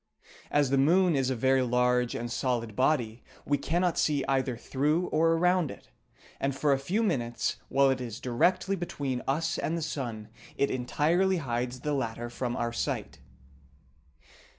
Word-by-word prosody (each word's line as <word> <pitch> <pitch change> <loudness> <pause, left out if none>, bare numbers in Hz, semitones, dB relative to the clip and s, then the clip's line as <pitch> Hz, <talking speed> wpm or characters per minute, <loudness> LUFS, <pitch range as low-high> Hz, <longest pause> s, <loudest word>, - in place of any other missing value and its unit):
As 145 -2 +2
the 135 - +3
moon 175 +4 +4
is 135 -2 +1
a 130 - 0
very 130 +2 +3
large 125 0 +1
and 120 0 -4
solid 115 -3 -1
body, 125 -4 +1 0.2
we 145 -1 +1
cannot 175 +3 0
see 145 -3 +1
either 130 -3 0
through 150 +8 0
or 165 +1 +3
around 180 -1 +2
it, - - -12 0.5
and 135 -1 -1
for 140 +1 +2
a 135 - 0
few 185 +12 0
minutes 120 - -1
while 135 +1 +4
it 130 -1 -2
is 115 -3 -6
directly 180 +10 +1
between 140 -8 -3
us 160 +4 0
and 165 - -1
the 165 - -3
sun 120 -8 -4 0.3
it 140 - +1
entirely 165 +9 +1
hides 125 -3 -3
the 150 +2 -1
latter 120 -3 -3
from 120 0 -3
our 120 0 -2
sight. 70 - -3
135 Hz, 165 wpm, -29 LUFS, 125-160 Hz, 0.5 s, moon